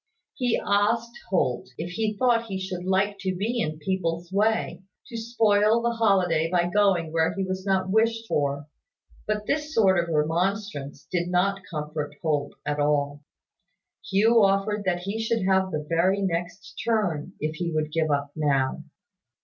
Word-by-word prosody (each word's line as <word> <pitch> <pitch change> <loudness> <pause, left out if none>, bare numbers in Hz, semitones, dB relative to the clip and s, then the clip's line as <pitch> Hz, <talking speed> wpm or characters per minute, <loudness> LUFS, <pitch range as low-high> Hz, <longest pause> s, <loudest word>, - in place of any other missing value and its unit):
He 245 -3 0
asked 225 +4 +1 0.2
Holt 130 -10 0
if 170 +2 -5
he 215 +2 -2
thought 235 -2 +2
he 190 -3 -4
should 185 -1 -5
like 195 +2 +1
to 190 -2 -2
be 225 +6 -1
in 155 -4 -2
people's 170 0 -2
way, 215 0 +1 0.3
to 235 - -8
spoil 220 -1 +3
the 235 - +2
holiday 185 -8 +2
by 175 0 +1
going 190 -5 +2
where 165 +3 +1
he 195 - -1
was 185 +1 -4
not 190 -1 +1
wished 225 +1 +2
for; 140 -3 -1 0.6
but 210 0 -1
this 300 +4 -2
sort 190 -4 +4
of 170 - -7
remonstrance 165 0 -1
did 175 -1 0
not 190 +2 +1
comfort 150 -1 -4
Holt 145 -3 -1
at 150 0 -1
all. 145 0 +1 0.9
Hugh 220 +4 +4
offered 200 +1 +1
that 175 -1 0
he 200 +4 -3
should 225 -3 0
have 190 0 +2
the 150 -3 -3
very 185 +5 +2
next 175 +1 -4
turn, 190 -7 0
if 155 +1 -3
he 170 0 -2
would 155 -1 -1
give 160 0 0
up 140 -1 0
now. 140 -4 0
185 Hz, 165 wpm, -25 LUFS, 160-210 Hz, 0.9 s, sort